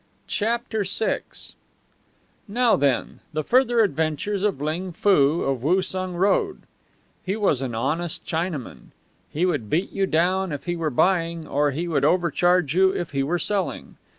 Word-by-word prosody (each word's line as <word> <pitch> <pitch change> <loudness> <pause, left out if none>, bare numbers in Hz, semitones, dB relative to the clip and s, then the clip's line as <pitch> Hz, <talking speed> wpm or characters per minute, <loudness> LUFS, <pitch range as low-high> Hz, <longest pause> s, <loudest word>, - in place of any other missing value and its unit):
CHAPTER 220 0 -1
VI 200 +3 0 1.3
Now, 235 +3 +3
then, 140 -3 0
the 155 0 -1
further 240 - +3
adventures 160 +2 0
of 200 -8 0
Ling 165 +5 -3
Foo 165 -5 +3
of 135 -3 -1
Woosung 185 +3 0
Road. 200 - +1 0.6
He 190 +2 -2
was 195 - +1
an 125 -4 -3
honest 155 +8 -2
Chinaman. 160 -5 -4 0.4
He 165 +5 0
would 120 - -1
beat 170 - 0
you 195 -1 0
down 185 +3 +1
if 145 - -5
he 175 -1 -2
were 165 -2 -1
buying, 165 +2 +1
or 145 0 +1
he 160 +5 -3
would 165 - 0
overcharge 175 -2 +2
you 190 +2 +5
if 175 -2 -3
he 140 -1 0
were 155 +6 0
selling. 195 +3 -3
175 Hz, 150 wpm, -24 LUFS, 150-195 Hz, 1.3 s, you